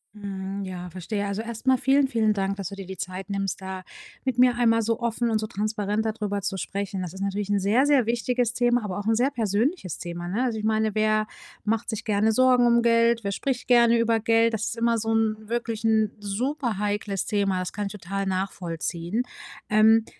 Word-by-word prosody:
Hm, 195 -1 -5
ja, 180 -1 -6
verstehe. 190 +4 -3
Also, 200 +2 -2
erst 230 +2 -7
mal 260 -1 +5
vielen, 270 +2 +3
vielen 220 -4 +2
Dank, 195 -1 -1
dass 195 -3 -5
du 200 - -8
dir 195 -1 -8
die 190 +1 -7
Zeit 185 +2 -6
nimmst, 195 -1 -2
da 190 -1 -6 0.4
mit 260 -2 -1
mir 250 -1 +6
einmal 230 -1 +3
so 230 +2 -1
offen 235 0 0
und 220 -1 +1
so 215 - -3
transparent 210 0 -2
da 220 - 0
drüber 205 -2 -3
zu 195 0 -2
sprechen. 195 +1 -3
Das 175 -3 -4
ist 190 - -9
natürlich 200 +1 -2
'n 205 -1 +2
sehr, 220 +8 +3
sehr 280 -5 +4
wichtiges 240 0 0
Thema, 240 -2 +2
aber 190 -1 -4
auch 205 +1 -4
'n 225 - +3
sehr 255 +4 +2
persönliches 225 - -1
Thema, 175 0 -6
ne? 225 +7 0
Also, 235 -3 -1
ich 215 - -5
meine: 220 -1 +1
Wer 215 0 +2 0.4
macht 225 +2 0
sich 220 0 -4
gerne 215 +1 +2
Sorgen 250 +1 +4
um 235 0 +4
Geld? 230 -1 +3
Wer 200 - -1
spricht 255 +1 -2
gerne 235 -1 +5
über 230 -1 +2
Geld? 230 0 +3
Das 220 0 -2
ist 230 - -4
immer 230 0 +2
so 225 0 -2
'n 220 -1 +2
wirklich 230 -2 -2
'n 220 -2 +3
superheikles 210 -3 -2
Thema. 200 -3 0
Das 185 - -4
kann 205 -1 -3
ich - - -7
total 195 0 -4
nachvollziehen. 185 +1 -2 0.5
Ähm 220 +1 +5
215 Hz, 215 wpm, -25 LUFS, 195-235 Hz, 0.5 s, mir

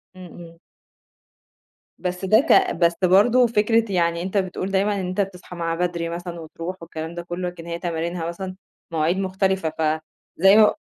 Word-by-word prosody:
إمم، 185 - -10
إمم. 165 -1 -12 1.4
بس 180 +1 -3
ده 215 +4 +5
ك 305 - +4
بس 170 0 +3
برضه 230 +7 +5
فكرة 225 -1 +2
يعني 170 -2 +1
أنت 190 +3 -2
بتقول 185 0 -2
دايمًا 200 +2 +1
إن 180 - -3
أنت 185 +2 0
بتصحى 180 -2 -6
معاه 165 -1 -2
بدري 170 -1 -2
مثلًا 170 0 -6
وتروح 165 +3 -6
والكلام 160 0 -7
ده 175 - -4
كلّه، 175 +1 -4
لكن 170 -1 -11
هي 170 0 -4
تمارينها 170 0 -3
مثلًا 185 +2 -5 0.4
مواعيد 165 +3 +1
مختلفة 190 -2 0
ف 155 0 0 0.4
زي 195 +4 +6
م 215 -1 +7
180 Hz, 170 wpm, -23 LUFS, 170-190 Hz, 1.4 s, م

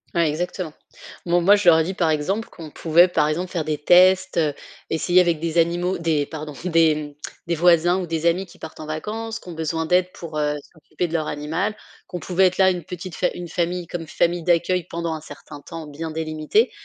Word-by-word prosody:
Ouais 170 -1 +3
exactement. 170 +1 -3 0.5
Bon 175 +1 +3
moi, 200 +4 +6
je 205 -3 +4
leur 160 - +7
ai - - +3
dit, 185 +4 -3
par 175 -3 +1
exemple, 190 +9 -1
qu'on 160 -3 -11
pouvait, 170 +4 +4
par 155 -4 +1
exemple, 175 +4 -2
faire 170 -3 -1
des 155 -1 -1
tests, 185 +4 +4
heu, 155 -3 +2 0.4
essayer 175 +3 +3
avec 170 -3 +1
des 165 +1 0
animaux, 175 +2 +1
des 160 -4 +1
pardon 155 -1 -7
des 155 -4 +2 0.3
des 170 - 0
voisins 175 +1 +4
ou 180 - -4
des 165 0 -3
amis 175 +3 +2
qui - - -17
partent 160 - -9
en 155 - -7
vacances, 220 +8 -4
qui 180 - -13
ont - - -6
besoin 160 0 -2
d'aide 180 +2 +2
pour, 160 -3 -7
heu, 150 0 0 0.2
s'occuper 170 +2 -4
de 165 - -9
leur 155 -2 0
animal, 160 +8 -2 0.3
qu'on 180 - -6
pouvait 185 +2 +3
être 180 - -3
là, 190 -1 +5
une 175 -2 -4
petite 180 +1 -8
fa 180 - +1
une 175 0 -6
famille 175 +1 -2
comme 165 -2 -6
famille 170 +2 0
d'accueil 175 +1 +1
pendant 170 -1 -3
un 155 - -6
certain 145 -1 -11
temps 165 +1 -8
bien 155 +3 -6
délimité. 160 +8 0
170 Hz, 220 wpm, -22 LUFS, 155-180 Hz, 0.5 s, leur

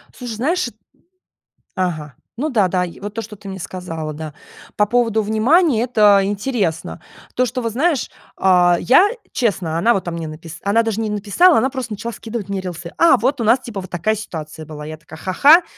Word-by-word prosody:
Слушай, 245 -3 -6
знаешь, 310 +11 0
эт - - -11 1.0
Ага, 155 -6 -2 0.2
ну 300 +5 -1
да, 215 -9 +3
да, 180 0 0
и 170 - -10
вот 205 +1 -6
то, 225 - -3
что 210 -2 -10
ты 200 - -12
мне 190 0 -6
сказала. 165 -2 -5
Да, 155 0 -7 0.4
по 210 - +3
поводу 225 0 +1
внимания- 235 - +3
это 210 -5 +5
интересно. 200 -4 -2 0.3
То, 255 - +2
что 250 +1 -3
вот, 230 -1 -2
знаешь, 285 +3 0 0.3
а, 180 -2 +4
я 355 +11 +5 0.2
честно, 185 -9 -1
она 230 +8 +4
вот 195 - -2
мне 165 -1 -4
написала 160 +1 -9
она 225 +3 +3
даже 225 -1 -2
не 220 -1 -1
написала, 210 - +4
она 260 - +1
просто 255 -5 -5
начала 230 +3 -5
скидывать 220 -2 -6
мне 195 -1 -2
рилсы. 175 -2 -7
А, 335 - +6
вот 260 +5 0
у - - 0
нас, 235 +4 +5
типа, 230 -6 -6
вот 185 - -10
такая 200 +6 0
ситуация 160 -6 -7
была. 150 -1 -8
Я 155 +1 -7
такая: 155 0 -13
"Ха-ха", 285 - +5
210 Hz, 200 wpm, -19 LUFS, 175-240 Hz, 1.0 s, А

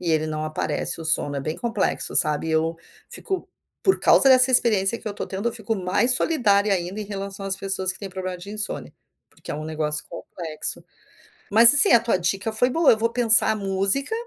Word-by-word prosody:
e 175 - -3
ele 155 -1 0
não 155 0 -4
aparece, 155 +1 -3
o 165 - -8
sono, 145 -2 -1
é 140 - -3
bem 155 +4 -5
complexo, 230 -4 -2
sabe. 150 0 +2
E - - -2
eu 160 +1 0 0.4
fico 380 -1 -5 0.4
por 380 - +1
causa 270 - +5
dessa 255 0 +6
experiência 230 -4 +3
que - - -19
eu - - -2
estou 205 - -7
tendo, 195 +4 -6
eu - - -6
fico 225 -1 -4
mais 195 +6 0
solidária 210 -9 +1
ainda 185 +2 -3
em - - -5
relação 195 -1 -7
às 195 0 -2
pessoas 190 -1 -1
que - - -13
têm 200 - -8
problema 185 -1 -6
de 190 +3 -11
insônia, 215 0 -4 0.4
porque - - -13
é - - -4
um 155 +1 -7
negócio 155 -1 -3
complexo. 160 -4 -5 0.7
Mas 230 +4 +8
assim, 290 - +5
a 235 - +7
tua 230 -5 -1
dica 195 +5 -2
foi 245 +4 +1
boa, 325 +3 +3
eu 225 - +2
vou 230 +1 -1
pensar 230 -2 +4
música 195 - 0
195 Hz, 215 wpm, -22 LUFS, 175-230 Hz, 0.7 s, Mas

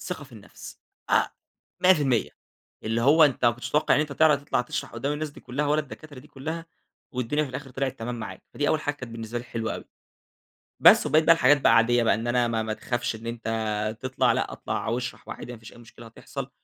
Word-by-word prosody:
الثقة - - -6
في - - -19
النفس. - - -12 0.3
أ - - +4 0.6
100%. 145 -10 +3 0.5
اللي 115 +1 0
هو 155 +5 +6
أنت 135 -4 +1
ما 120 - +7
كنتش 120 +1 -7
متوقّع 150 - +3
إن - - +3
أنت 150 -1 -2
تعرف 150 -1 +4
تطلع 145 - 0
تشرح 125 - -5
قُدّام 125 +5 -2
الناس 150 0 -3
دي - - -14
كُلّها 145 +4 -3
ولا 150 +1 +2
الدكاترة 150 -1 -11
دي 140 +4 -14
كُلّها، 160 +4 -6 0.5
والدنيا 125 +5 0
في 135 - -8
الآخر 135 +1 -7
طلعت 135 0 -3
تمام 120 +2 -4
معاك، 105 -5 -7
فدي 145 - 0
أول 155 - +2
حاجة 145 -1 -2
كانت 125 -5 -9
بالنسبة 115 +1 -5
لي 120 - -8
حلوة 115 -2 -3
أوي. - - -8 1.0
بس - - +8
وبقية 155 +1 +4
بقى 165 - +7
الحاجات 145 -2 +4
بقى 115 - +5
عادية 120 +1 +4
بقى، 115 - +3
إن 115 +3 -4
أنا 120 0 +2
ما 115 -1 0
ما 110 0 -3
تخافش 120 +1 -2
إن 115 +1 -11
أنت 110 -2 -2
تطلع، 130 0 +1
لأ - - -1
أطلع - - -4
أو 115 +2 0
اشرح 125 - -7
وعادي 125 - -7
ما 120 - -10
فيش 115 +1 -13
أي - - -15
مشكلة 120 0 -14
هتحصل، 115 - -8
125 Hz, 225 wpm, -26 LUFS, 115-145 Hz, 1.0 s, بس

